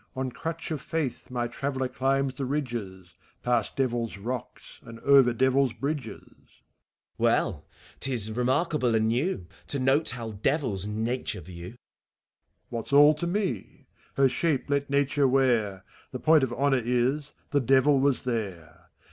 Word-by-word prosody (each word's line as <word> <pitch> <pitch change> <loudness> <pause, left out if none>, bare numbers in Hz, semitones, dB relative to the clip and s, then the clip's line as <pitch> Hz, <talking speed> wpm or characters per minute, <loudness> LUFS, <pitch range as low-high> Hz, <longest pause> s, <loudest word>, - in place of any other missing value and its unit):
On 130 -1 -2
crutch 165 +5 -5
of 150 -4 -3
faith 150 -3 -3
my 120 -1 -2
traveller 130 +1 -3
climbs 135 +1 0
the 135 +1 -4
ridges. 115 - -4 0.3
Past 120 -3 0
Devil's 120 -5 -1
Rocks 120 +4 -7
and 115 -1 -11
over 135 -3 +6
Devil's 130 +1 +2
Bridges. 140 -6 -4
VAUST. - - -29 0.6
Well, - - +1
— - - -24
't 135 - +1
is 110 -4 +2
remarkable 130 +1 +1
and 110 0 +2
new 125 - -1 0.2
To 140 - +2
note 135 +4 +3
how 115 -2 -4
Devils 105 - -1
Nature 115 +4 -2
view. 90 +6 -10
HEPHISTOPHELBS. - - -53
What's 115 +2 -5
all 145 +2 +8
to 155 +3 -4
mef 180 - -3 0.3
Her 135 0 +5
shape 145 0 -1
let 140 0 0
Nature 140 0 +2
w«ar! 115 -8 +1 0.3
The 125 - -5
point 155 0 +4
ot 125 - -8
honor 135 0 +2
is, 125 +5 0 0.2
the 145 - +3
Devil 135 +2 +4
was 140 -1 +1
there 90 -8 -5
130 Hz, 155 wpm, -27 LUFS, 115-140 Hz, 0.6 s, all